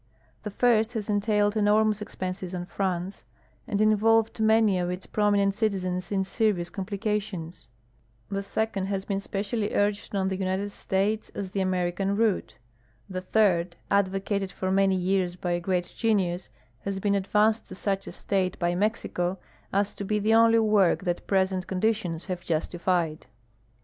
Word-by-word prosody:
The 210 Hz, -, -5 dB
first 225 Hz, +1 st, +2 dB
has 215 Hz, -2 st, -3 dB
entailed 205 Hz, 0 st, +2 dB
enormous 215 Hz, 0 st, +3 dB
exiienses 185 Hz, -3 st, -5 dB
on 175 Hz, -, -4 dB
France 185 Hz, 0 st, -3 dB, 0.4 s
and 205 Hz, -2 st, -1 dB
involved 220 Hz, +1 st, +3 dB
many 220 Hz, -3 st, +4 dB
of 175 Hz, 0 st, -1 dB
its 180 Hz, +1 st, -5 dB
promi 205 Hz, -1 st, +2 dB
nent 200 Hz, 0 st, +2 dB
citizens 185 Hz, -4 st, -1 dB
in 195 Hz, -1 st, +1 dB
serious 190 Hz, -4 st, 0 dB
conqdications; 195 Hz, -, -4 dB, 0.6 s
the 195 Hz, 0 st, -2 dB
second 200 Hz, -1 st, -2 dB
has 195 Hz, -1 st, -2 dB
been 195 Hz, -1 st, -1 dB
spe 200 Hz, 0 st, -3 dB
cially 210 Hz, 0 st, -2 dB
urged 205 Hz, 0 st, 0 dB
on 190 Hz, -1 st, +1 dB
the 190 Hz, -, -1 dB
United 190 Hz, +2 st, -2 dB
States 200 Hz, +3 st, -1 dB
as 190 Hz, -2 st, -4 dB
the 200 Hz, -, -2 dB
Ameriean 185 Hz, +1 st, 0 dB
route; 220 Hz, -3 st, +1 dB, 0.5 s
the 185 Hz, -1 st, -4 dB
third, 185 Hz, -3 st, +2 dB, 0.2 s
advocated 195 Hz, 0 st, 0 dB
for 185 Hz, -1 st, -2 dB
many 195 Hz, 0 st, +3 dB
years 185 Hz, -1 st, 0 dB
by 175 Hz, -1 st, -3 dB
a 175 Hz, -, +1 dB
great 175 Hz, 0 st, -2 dB
genius, 190 Hz, -6 st, 0 dB, 0.3 s
has 195 Hz, +4 st, -4 dB
been 200 Hz, +1 st, +1 dB
ad 195 Hz, -1 st, -1 dB
vanced 215 Hz, +1 st, +3 dB
to -, -, -9 dB
snch 195 Hz, 0 st, -2 dB
a -, -, -5 dB
stage 190 Hz, -2 st, -1 dB
liy 175 Hz, 0 st, 0 dB
Mexico 190 Hz, -3 st, -1 dB, 0.3 s
as 200 Hz, +1 st, +1 dB
to -, -, -6 dB
be 210 Hz, +2 st, 0 dB
the 215 Hz, +2 st, +2 dB
only 230 Hz, 0 st, +6 dB
Avork 210 Hz, -5 st, +3 dB
that 175 Hz, -2 st, -2 dB
jiresent 190 Hz, -1 st, +1 dB
conditions 190 Hz, -4 st, -1 dB
haA'e 185 Hz, -2 st, -4 dB
justified. 170 Hz, 0 st, -1 dB
195 Hz, 165 wpm, -27 LUFS, 185-210 Hz, 0.6 s, only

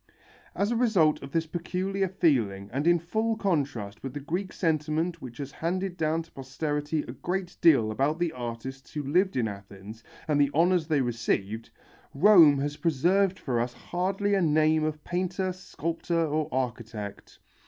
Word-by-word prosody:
As 205 Hz, +3 st, 0 dB
a -, -, +1 dB
result 200 Hz, -11 st, +3 dB
of 135 Hz, -, -9 dB
this 165 Hz, +1 st, 0 dB
peculiar 185 Hz, +4 st, -2 dB
feeling 115 Hz, -, +1 dB
and 140 Hz, +5 st, -1 dB
in 175 Hz, 0 st, +6 dB
full 220 Hz, +7 st, -1 dB
contrast 140 Hz, -, -2 dB
with 135 Hz, 0 st, -6 dB
the -, -, -3 dB
Greek 175 Hz, +7 st, -3 dB
sentiment 160 Hz, +1 st, -1 dB
which 120 Hz, -2 st, -9 dB
has 140 Hz, -1 st, -6 dB
handed 180 Hz, +4 st, -2 dB
down 160 Hz, -1 st, 0 dB
to 165 Hz, -, -23 dB
posterity 145 Hz, +3 st, -3 dB
a -, -, -8 dB
great 180 Hz, 0 st, -4 dB
deal 135 Hz, -10 st, +5 dB
about 140 Hz, +7 st, 0 dB
the 170 Hz, -1 st, 0 dB
artists 125 Hz, +2 st, -7 dB
who 150 Hz, -, -3 dB
lived 180 Hz, +8 st, +2 dB
in 115 Hz, -3 st, +1 dB
Athens 100 Hz, +2 st, -10 dB, 0.2 s
and 145 Hz, -2 st, +3 dB
the 140 Hz, -, +4 dB
honours 170 Hz, 0 st, +3 dB
they 150 Hz, -4 st, +2 dB
received, 115 Hz, -3 st, -2 dB, 0.5 s
Rome 165 Hz, -4 st, +7 dB
has 145 Hz, +2 st, -2 dB
preserved 180 Hz, +5 st, +2 dB
for 125 Hz, -9 st, -1 dB
us 120 Hz, +1 st, -1 dB
hardly 195 Hz, +3 st, -1 dB
a 195 Hz, -, +3 dB
name 155 Hz, -1 st, +3 dB
of 155 Hz, -1 st, -3 dB
painter, 185 Hz, +1 st, -2 dB
sculptor 170 Hz, -2 st, -2 dB
or 155 Hz, 0 st, -1 dB
architect. 115 Hz, -5 st, -4 dB
155 Hz, 165 wpm, -27 LUFS, 130-180 Hz, 0.5 s, Rome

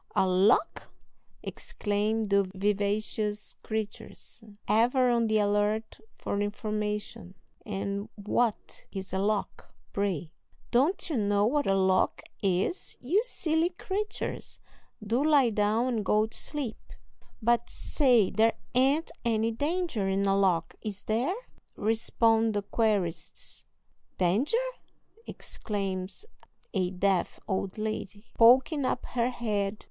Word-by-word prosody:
"A -, -, +4 dB
lock!" 190 Hz, -, +2 dB, 0.5 s
exclaim 210 Hz, +1 st, -1 dB
the 200 Hz, 0 st, +5 dB
vivacious 210 Hz, +1 st, -1 dB
creatures, 220 Hz, +1 st, -6 dB, 0.2 s
ever 245 Hz, +3 st, +3 dB
on 235 Hz, -1 st, +2 dB
the 215 Hz, 0 st, +2 dB
alert 210 Hz, +1 st, 0 dB, 0.2 s
for 200 Hz, -, -2 dB
information; 210 Hz, -2 st, -3 dB, 0.3 s
"and 200 Hz, +1 st, -3 dB
what 215 Hz, +2 st, -1 dB
is 190 Hz, -2 st, -6 dB
a 190 Hz, -, 0 dB
lock, 205 Hz, +1 st, -2 dB, 0.2 s
pray?" 185 Hz, -6 st, -1 dB, 0.4 s
"Don't 280 Hz, +10 st, +2 dB
you 310 Hz, -6 st, -1 dB
know 205 Hz, -1 st, +2 dB
what 285 Hz, +5 st, +1 dB
a 195 Hz, -, +3 dB
lock 190 Hz, -1 st, +2 dB, 0.2 s
is, 195 Hz, -, 0 dB
you 345 Hz, -, +2 dB
silly 330 Hz, -8 st, 0 dB
creatures. 400 Hz, +3 st, -4 dB, 0.5 s
Do 235 Hz, +6 st, +1 dB
lie 285 Hz, -6 st, +4 dB
down 215 Hz, +3 st, +2 dB
and 230 Hz, -4 st, 0 dB
go 210 Hz, +2 st, +3 dB
to 220 Hz, -, -9 dB
sleep." 280 Hz, -7 st, -2 dB, 0.6 s
"But 235 Hz, +1 st, +2 dB
say, 245 Hz, -9 st, +3 dB
there 225 Hz, +1 st, +3 dB, 0.2 s
ain't 270 Hz, +6 st, +2 dB
any 225 Hz, -1 st, +1 dB
danger 290 Hz, -, -1 dB
in 195 Hz, +1 st, +1 dB
a 195 Hz, 0 st, +3 dB
lock, 185 Hz, -4 st, +2 dB
is 205 Hz, -2 st, -5 dB
there?" 245 Hz, -, 0 dB, 0.4 s
respond 225 Hz, 0 st, +2 dB
the 205 Hz, -, 0 dB
querists. 195 Hz, -7 st, -2 dB, 0.5 s
"Danger!" 210 Hz, -, +2 dB, 0.7 s
exclaims 195 Hz, -, -4 dB, 0.5 s
a 185 Hz, -3 st, +1 dB
deaf 190 Hz, 0 st, 0 dB
old 190 Hz, 0 st, -2 dB
lady, 215 Hz, -1 st, -4 dB
poking 260 Hz, +6 st, +5 dB
up 255 Hz, -, -1 dB
her 240 Hz, -1 st, +1 dB
head. 210 Hz, -4 st, -2 dB
215 Hz, 120 wpm, -29 LUFS, 200-240 Hz, 0.7 s, the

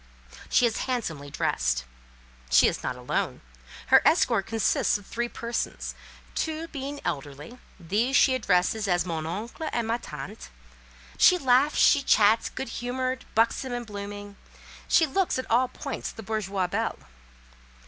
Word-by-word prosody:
She 250 Hz, -, +4 dB
is 225 Hz, -2 st, 0 dB
handsomely 160 Hz, -, -3 dB
dressed. 60 Hz, -, 0 dB, 0.7 s
She -, -, +6 dB
is -, -, -2 dB
not -, -, -3 dB
alone; 125 Hz, 0 st, -2 dB, 0.5 s
her -, -, +7 dB
escort 195 Hz, -, +3 dB
consists 225 Hz, -1 st, +1 dB
of 205 Hz, -, -15 dB
three 240 Hz, +3 st, -3 dB
persons—two 310 Hz, +7 st, -5 dB
being 285 Hz, 0 st, -5 dB
elderly; 145 Hz, -, -5 dB, 0.2 s
these 210 Hz, +10 st, 0 dB
she 265 Hz, -, +5 dB
addresses 200 Hz, -2 st, +1 dB
as 175 Hz, -1 st, +1 dB
"Mon 160 Hz, -3 st, -3 dB
Oncle" 225 Hz, -, -5 dB
and 235 Hz, -2 st, -1 dB
"Ma 230 Hz, +1 st, 0 dB
Tante." 150 Hz, +9 st, -8 dB, 0.7 s
She 365 Hz, -, +7 dB
laughs, 270 Hz, 0 st, +3 dB
she 285 Hz, -, +5 dB
chats; 220 Hz, -4 st, +4 dB
good 265 Hz, -2 st, -6 dB
humoured, 255 Hz, +1 st, -2 dB
buxom, 235 Hz, +3 st, +1 dB
and 240 Hz, 0 st, -4 dB
blooming, 205 Hz, -1 st, -8 dB, 0.5 s
she 325 Hz, -, +5 dB
looks, 345 Hz, +4 st, 0 dB
at 260 Hz, -, -3 dB
all 250 Hz, +3 st, +4 dB
points, -, -, -6 dB
the 225 Hz, -, -10 dB
bourgeoise 200 Hz, -3 st, -2 dB
belle. 225 Hz, +2 st, -1 dB
225 Hz, 140 wpm, -26 LUFS, 190-255 Hz, 0.7 s, her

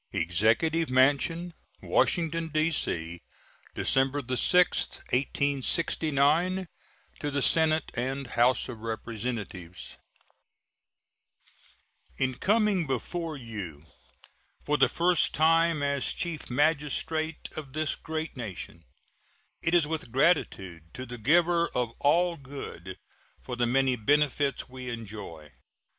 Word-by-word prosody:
EXECUTIVE 110 Hz, -, +1 dB
MANSION, 145 Hz, +7 st, +2 dB, 0.3 s
Washington, 165 Hz, -1 st, +1 dB
D.C., 145 Hz, -, -1 dB, 0.6 s
December 135 Hz, +2 st, +1 dB
6, 180 Hz, +7 st, +4 dB, 0.3 s
1869. 150 Hz, +5 st, +1 dB, 0.5 s
To 145 Hz, -, -2 dB
the 140 Hz, -1 st, 0 dB
Senate 160 Hz, -1 st, +3 dB
and 135 Hz, +3 st, -3 dB
House 125 Hz, +1 st, +2 dB
of 120 Hz, -3 st, -8 dB
Representatives: 110 Hz, -5 st, -6 dB, 2.2 s
In 130 Hz, 0 st, 0 dB
coming 205 Hz, -, +1 dB
before 155 Hz, +5 st, -3 dB
you 100 Hz, -, -8 dB, 0.8 s
for 150 Hz, -, +1 dB
the -, -, +4 dB
first 175 Hz, +1 st, +3 dB
time 165 Hz, -1 st, +3 dB
as 140 Hz, -1 st, +1 dB
Chief 170 Hz, -4 st, -4 dB
Magistrate 155 Hz, +3 st, 0 dB
of 140 Hz, -4 st, -7 dB
this 155 Hz, -1 st, 0 dB
great 160 Hz, 0 st, -5 dB
nation, 95 Hz, -8 st, -7 dB, 0.8 s
it 165 Hz, +2 st, +1 dB
is 170 Hz, -3 st, +5 dB
with 155 Hz, -5 st, -4 dB
gratitude 95 Hz, -, 0 dB
to 130 Hz, -, -6 dB
the 120 Hz, -1 st, -8 dB
Giver 170 Hz, +7 st, +3 dB
of 125 Hz, -2 st, 0 dB
All 170 Hz, +4 st, +3 dB
Good 130 Hz, -10 st, -8 dB, 0.5 s
for 125 Hz, -, -5 dB
the 120 Hz, 0 st, +1 dB
many 130 Hz, +1 st, +2 dB
benefits 140 Hz, +2 st, +1 dB
we 130 Hz, -1 st, -8 dB
enjoy. 100 Hz, -10 st, -8 dB
140 Hz, 105 wpm, -28 LUFS, 120-160 Hz, 2.2 s, is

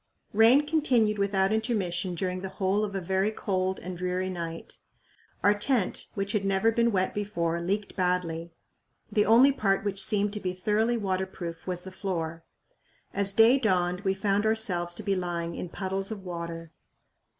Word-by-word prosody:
Rain 230 Hz, +7 st, +6 dB
continued 250 Hz, -9 st, +2 dB
without 195 Hz, -1 st, +2 dB
intermission 190 Hz, -6 st, -1 dB
during 185 Hz, +1 st, -2 dB
the 190 Hz, -, -5 dB
whole 190 Hz, +2 st, 0 dB
of 200 Hz, -2 st, -3 dB
a -, -, 0 dB
very 190 Hz, +3 st, +1 dB
cold 190 Hz, -3 st, -1 dB
and 185 Hz, 0 st, -6 dB
dreary 180 Hz, +1 st, -1 dB
night. 165 Hz, -2 st, -6 dB, 0.6 s
Our 205 Hz, -, +6 dB
tent, 210 Hz, 0 st, 0 dB
which 195 Hz, 0 st, -2 dB
had 210 Hz, -2 st, 0 dB
never 195 Hz, +3 st, +2 dB
been 235 Hz, +1 st, +2 dB
wet 190 Hz, -2 st, 0 dB
before, 170 Hz, -5 st, -2 dB
leaked 200 Hz, +4 st, -2 dB
badly; 175 Hz, -2 st, -1 dB, 0.6 s
the 210 Hz, -2 st, +2 dB
only 240 Hz, +5 st, +7 dB
part 195 Hz, -7 st, +1 dB
which 195 Hz, -1 st, +1 dB
seemed 205 Hz, 0 st, +1 dB
to 210 Hz, -, -2 dB
be 185 Hz, -2 st, -3 dB
thoroughly 215 Hz, +5 st, +1 dB
waterproof 190 Hz, -4 st, -4 dB
was 180 Hz, -1 st, -3 dB
the 190 Hz, -, -8 dB
floor. 165 Hz, -4 st, -4 dB, 0.7 s
As 200 Hz, 0 st, 0 dB
day 230 Hz, +4 st, +6 dB
dawned 180 Hz, -5 st, +1 dB
we 190 Hz, -1 st, 0 dB
found 200 Hz, +1 st, +1 dB
ourselves 190 Hz, -6 st, +1 dB
to 215 Hz, -, -6 dB
be 200 Hz, -1 st, +1 dB
lying 170 Hz, -2 st, -3 dB
in 175 Hz, -, -5 dB
puddles 195 Hz, +3 st, -3 dB
of 200 Hz, -3 st, -6 dB
water. 170 Hz, -2 st, -6 dB
195 Hz, 170 wpm, -28 LUFS, 180-210 Hz, 0.7 s, only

